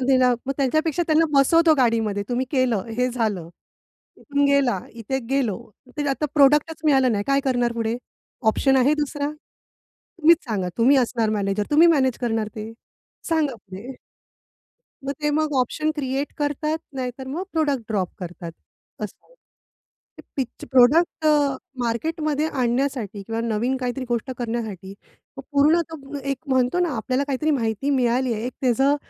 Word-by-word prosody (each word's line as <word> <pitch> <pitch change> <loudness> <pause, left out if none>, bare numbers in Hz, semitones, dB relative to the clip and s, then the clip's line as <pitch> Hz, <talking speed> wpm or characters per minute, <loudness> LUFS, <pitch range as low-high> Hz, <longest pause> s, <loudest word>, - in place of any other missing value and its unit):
मग 260 - -2
ते 265 - +5
ना 250 -1 +4 0.3
त्यांच्यापेक्षा 310 +4 +1
त्यांना 320 +1 +4
बसवतो 320 +4 +5
गाडीमध्ये 225 -5 +1
तुम्ही 250 +1 -1
केलं 255 -8 +1
हे 250 +1 +2
झालं. 215 -9 -2 0.7
इथून 285 -1 0
गेला, 280 -7 +3
इथे 230 +3 -3
गेलो, 265 -7 +1 0.4
ते 290 -1 0
आता 285 +3 -1
प्रॉडक्टच 295 +3 +4
मिळालं 265 -5 +4
नाही. 205 -1 -1
काय 275 0 +3
करणार 245 -3 +1
पुढे? 230 0 -2 0.5
ऑप्शन 270 +4 +2
आहे 265 +3 +4
दुसरा? 290 -1 -2 0.9
तुम्हीच 330 +1 +6
सांगा 200 -6 -2
तुम्ही 255 +5 +5
असणार 235 -3 +1
मॅनेजर 205 -1 0
तुम्ही 315 +3 +6
मॅनेज 265 -6 +2
करणार 225 -3 0
ते 215 +1 -6 0.6
सांगा 315 -5 +1
पुढे. 200 +3 -10 1.1
मग 275 - -2
ते 295 - +2
मग 305 0 0
ऑप्शन 305 +5 -1
क्रिएट 275 0 -2
करतात, 300 +2 -1 0.2
नाहीतर 260 0 -5
मग 310 +7 -3
प्रॉडक्ट 290 -6 0
ड्रॉप 195 -5 0
करतात 175 -2 -7 0.5
असं 210 - -7
आहे. - - -24 1.0
पिच 260 -3 -4
प्रॉडक्ट 285 +6 +4
अ, - - +6 0.5
मार्केटमध्ये 305 +5 -1
आणण्यासाठी 245 -5 -1
किंवा 225 +3 -3
नवीन 230 +3 0
काहीतरी 255 0 -3
गोष्ट 240 +2 -2
करण्यासाठी 220 -5 -4 0.4
मग 270 - -7
पूर्णतः 295 -1 +1
एक 275 - -2
म्हणतो 260 +4 +2
ना 355 - +2
आपल्याला 255 +5 -1
काहीतरी 285 +3 0
माहिती 235 -1 0
मिळाली 255 -1 +1
आहे 215 +1 -4
एक 250 - -4
त्याचं 270 +3 +3
260 Hz, 150 wpm, -23 LUFS, 230-290 Hz, 1.1 s, तुम्हीच